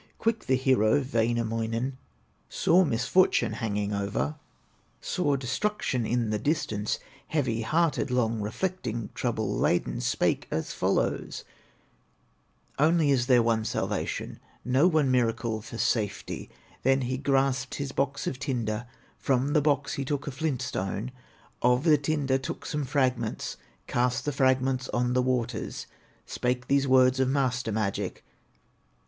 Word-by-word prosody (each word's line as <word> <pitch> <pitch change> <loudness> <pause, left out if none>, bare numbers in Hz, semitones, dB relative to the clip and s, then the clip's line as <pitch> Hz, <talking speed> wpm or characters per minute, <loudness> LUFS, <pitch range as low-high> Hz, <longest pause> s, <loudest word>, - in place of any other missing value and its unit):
Quick 225 0 -1
the 130 - +4
hero, 130 -3 +3
Wainamoinen, 115 0 -1 0.5
Saw 180 +3 +4
misfortune 150 +7 +2
hanging 105 -3 -2
over, 100 +8 -1 0.7
Saw 145 -6 0
destruction 130 - -1
in 120 -2 0
the 105 - 0
distance; 110 -6 -1 0.3
Heavy 125 -7 0
hearted, 155 +6 +1
long 115 -3 +1
reflecting, 120 - -3
Trouble 110 -4 -1
laden, 85 - +1
spake - - 0
as 80 - -3
follows: - - -1 1.4
"Only 155 0 +4
is 125 -3 +2
there 125 -3 +5
one 115 -1 +1
salvation, - - -3 0.3
Know 130 +7 +4
one 155 -6 +3
miracle 115 -2 0
for 115 +1 -8
safety!" 110 -3 -1 0.3
Then 135 +1 +3
he 130 +1 -2
grasped 135 -2 +1
his 140 -1 -4
box 140 +1 -1
of 130 - -3
tinder, 120 -5 -2 0.3
From 135 +2 +1
the 150 - +4
box 145 -1 +1
he 140 - -2
took 140 +1 -2
a 145 - -3
flint 135 -2 -2
stone, 105 +1 -3 0.5
Of 125 +2 +3
the 155 -3 +5
tinder 140 -3 0
took 130 - -6
some 150 -1 -2
fragments, 125 -5 -1 0.3
Cast 125 0 0
the 145 - 0
fragments 130 -1 +1
on 125 0 0
the 125 - +3
waters, 125 -2 -2 0.4
Spake 125 0 -2
these 140 0 +3
words 130 0 +5
of 130 -1 +2
master 125 -4 0
magic. 105 -2 -2
130 Hz, 135 wpm, -27 LUFS, 115-140 Hz, 1.4 s, there